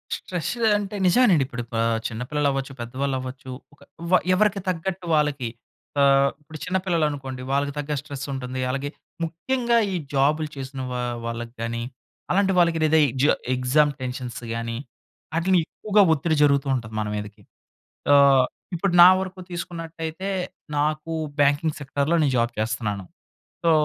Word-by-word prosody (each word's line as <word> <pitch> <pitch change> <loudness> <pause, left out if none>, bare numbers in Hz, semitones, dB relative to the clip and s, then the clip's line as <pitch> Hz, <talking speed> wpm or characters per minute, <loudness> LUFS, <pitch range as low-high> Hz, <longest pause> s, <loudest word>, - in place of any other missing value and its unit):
Stress 175 -3 -4 0.3
అంటే, 205 0 -5
నిజవేనండి. 185 - +5
ఇప్పుడు 120 -2 -5
ప - - -2 0.3
చిన్న 115 0 -6
పిల్లలవ్వచ్చు, 140 -2 0
పెద్దవాళ్ళవ్వచ్చు. 130 +2 -4 0.2
ఒక - - -23 0.3
వ - - +3 0.2
ఎవరికి 205 +1 +2
తగ్గట్టు 185 +1 -2
వాళ్ళకి, 145 -5 +1 0.5
ఆహ్, 140 0 +5
ఇప్పుడు 155 +1 -11
చిన్న 190 - 0
పిల్లలనుకోండి, 145 -7 -1
వాళ్ళకి 140 +1 0
తగ్గ 145 0 -3
స్ట్రెస్సుంటుంది. 135 -3 -5
అలాగే, 135 +2 -2 0.3
ముఖ్యంగా 235 +9 0 0.2
ఈ - - 0 0.2
జాబులు 150 +3 +2
చేసిన 135 0 -6
వా 125 0 -2 0.2
వాళ్ళకి 115 0 -5
గానీ, 115 0 -3 0.5
అలాంటి 195 +1 +3
వాళ్ళకి 170 -1 +3
లేదా 155 +1 +4
ఈ - - -1
జ - - +6 0.3
ఎగ్జామ్ 140 +4 +3
టెన్షన్స్ 125 -2 -5
గాని, 115 0 -3 0.6
ఆటిలినెక్కువగా 185 +4 +2
ఒత్తిడి 160 +2 0
జరుగుతూ 140 -1 +3
ఉంటది 110 -3 -5
మన 105 - -2
మీదకి. 105 0 -6 0.7
ఆహ్, 140 -2 +6 0.3
ఇప్పుడు 190 +2 0
నా 180 - +11
వరకు 185 0 -6
తీసుకున్నట్టయితే, 165 +1 -5 0.5
నాకు 155 +2 -1 0.3
బ్యాంకింగ్ 145 +2 +2
సెక్టార్‌లో, 145 +4 0
నేను 140 -3 +2
జాబ్ 120 +1 +1
చేస్తనాను. 110 -3 -2 0.6
సో, 165 - +4
145 Hz, 135 wpm, -24 LUFS, 130-165 Hz, 0.7 s, నా